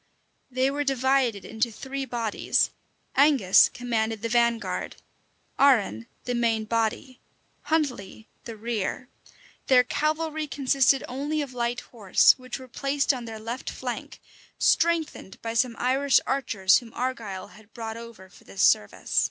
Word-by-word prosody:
They 260 Hz, +1 st, +1 dB
were 290 Hz, +1 st, -1 dB
divided 265 Hz, -5 st, +1 dB
into 225 Hz, +2 st, -1 dB
three 270 Hz, +4 st, -5 dB
bodies: 230 Hz, -4 st, 0 dB, 0.4 s
Angus 270 Hz, -10 st, +5 dB
commanded 225 Hz, -3 st, -2 dB
the 230 Hz, -, -1 dB
vanguard; 235 Hz, 0 st, 0 dB, 0.6 s
Arran 205 Hz, -, +3 dB, 0.2 s
the 245 Hz, -, -3 dB
main 230 Hz, -2 st, 0 dB
body; 230 Hz, +4 st, -2 dB, 0.5 s
Huntley 250 Hz, -9 st, -2 dB, 0.2 s
the 230 Hz, -, -7 dB
rear: 230 Hz, +2 st, -3 dB, 0.6 s
their 255 Hz, -1 st, +6 dB
cavalry 310 Hz, +3 st, -1 dB
consisted 275 Hz, -1 st, +2 dB
only 290 Hz, +4 st, -2 dB
of 265 Hz, -3 st, -9 dB
light 240 Hz, 0 st, -2 dB
horse, 205 Hz, -6 st, +4 dB
which 255 Hz, -1 st, -6 dB
were 260 Hz, -1 st, -11 dB
placed 275 Hz, +3 st, 0 dB
on 245 Hz, -2 st, -6 dB
their 225 Hz, -1 st, -7 dB
left 230 Hz, +4 st, -5 dB
flank, -, -, -6 dB, 0.4 s
strengthened 330 Hz, -, +1 dB
by 225 Hz, 0 st, -3 dB
some 235 Hz, 0 st, +1 dB
Irish 270 Hz, +2 st, +3 dB
archers 225 Hz, -8 st, +2 dB
whom 235 Hz, -3 st, -14 dB
Argyle 225 Hz, -7 st, -4 dB
had 215 Hz, 0 st, -18 dB
brought 225 Hz, -2 st, -6 dB
over 230 Hz, -5 st, -11 dB
for 185 Hz, -, -19 dB
this 195 Hz, -, -3 dB
service. 105 Hz, -, +2 dB
245 Hz, 135 wpm, -26 LUFS, 225-270 Hz, 0.6 s, their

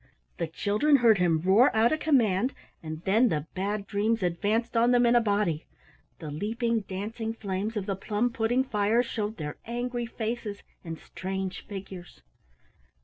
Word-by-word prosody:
The 170 Hz, -, -1 dB
children 210 Hz, -, +2 dB
heard 230 Hz, -6 st, +5 dB
him 165 Hz, -3 st, +2 dB
roar 205 Hz, +8 st, +6 dB
out 225 Hz, +2 st, +4 dB
a 310 Hz, -, +2 dB
command, 245 Hz, -6 st, +2 dB, 0.3 s
and 155 Hz, 0 st, -7 dB
then 225 Hz, +6 st, +4 dB
the 150 Hz, -4 st, -1 dB
Bad 200 Hz, +2 st, -2 dB
Dreams 210 Hz, +1 st, 0 dB
advanced 205 Hz, +7 st, 0 dB
on 230 Hz, +1 st, +4 dB
them 245 Hz, 0 st, +4 dB
in 235 Hz, +1 st, +4 dB
a 240 Hz, -, +6 dB
body. 200 Hz, -7 st, 0 dB, 0.5 s
The 155 Hz, -2 st, -7 dB
leaping 225 Hz, +8 st, -1 dB
dancing 220 Hz, +3 st, -5 dB
flames 205 Hz, +1 st, -3 dB
of 200 Hz, -, -2 dB
the 195 Hz, -1 st, -1 dB
plum 210 Hz, +5 st, -1 dB
pudding 235 Hz, +3 st, +1 dB
fire 220 Hz, 0 st, +2 dB
showed 220 Hz, -2 st, -3 dB
their 150 Hz, -3 st, -5 dB
angry 240 Hz, 0 st, -3 dB
faces 225 Hz, -3 st, -4 dB, 0.2 s
and 165 Hz, -2 st, -6 dB
strange 190 Hz, +1 st, -5 dB
figures. 190 Hz, -3 st, -9 dB
210 Hz, 160 wpm, -28 LUFS, 190-235 Hz, 0.5 s, roar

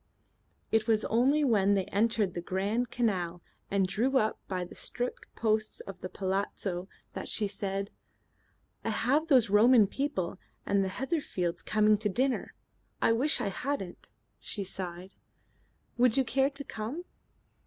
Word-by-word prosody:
It 220 Hz, 0 st, +2 dB
was 220 Hz, -1 st, +3 dB
only 270 Hz, +7 st, +3 dB
when 205 Hz, -6 st, +4 dB
they 190 Hz, -2 st, +1 dB
entered 210 Hz, -2 st, +1 dB
the 175 Hz, -, -3 dB
Grand 205 Hz, +7 st, -1 dB
Canal 180 Hz, -8 st, -1 dB, 0.3 s
and 195 Hz, -1 st, +2 dB
drew 230 Hz, +8 st, +1 dB
up 215 Hz, -3 st, +1 dB
by 185 Hz, -2 st, -2 dB
the -, -, -12 dB
striped 245 Hz, 0 st, -4 dB
posts 215 Hz, -1 st, 0 dB
of 195 Hz, -2 st, -9 dB
the 185 Hz, -, -5 dB
palazzo 190 Hz, -1 st, -2 dB, 0.3 s
that -, -, -5 dB
she 210 Hz, -, +1 dB
said: 195 Hz, 0 st, -3 dB, 0.9 s
"I -, -, -1 dB
have 270 Hz, +9 st, +1 dB
those 255 Hz, -9 st, +4 dB
Roman 220 Hz, +2 st, +7 dB
people 195 Hz, -6 st, -2 dB, 0.3 s
and 200 Hz, -1 st, +2 dB
the 190 Hz, -, -1 dB
Heatherfields 200 Hz, -, -2 dB
coming 215 Hz, -1 st, +3 dB
to 210 Hz, -, 0 dB
dinner. 255 Hz, +6 st, 0 dB, 0.4 s
I -, -, +3 dB
wish 260 Hz, +7 st, +2 dB
I 200 Hz, -, 0 dB
hadn't." 195 Hz, -3 st, -4 dB, 0.3 s
She 205 Hz, -, -3 dB
sighed. 185 Hz, 0 st, -5 dB, 0.9 s
"Would 250 Hz, 0 st, +4 dB
you 270 Hz, -, +5 dB
care 265 Hz, +2 st, +2 dB
to 280 Hz, 0 st, -5 dB
come?" 260 Hz, +9 st, -5 dB
215 Hz, 150 wpm, -30 LUFS, 195-245 Hz, 0.9 s, Roman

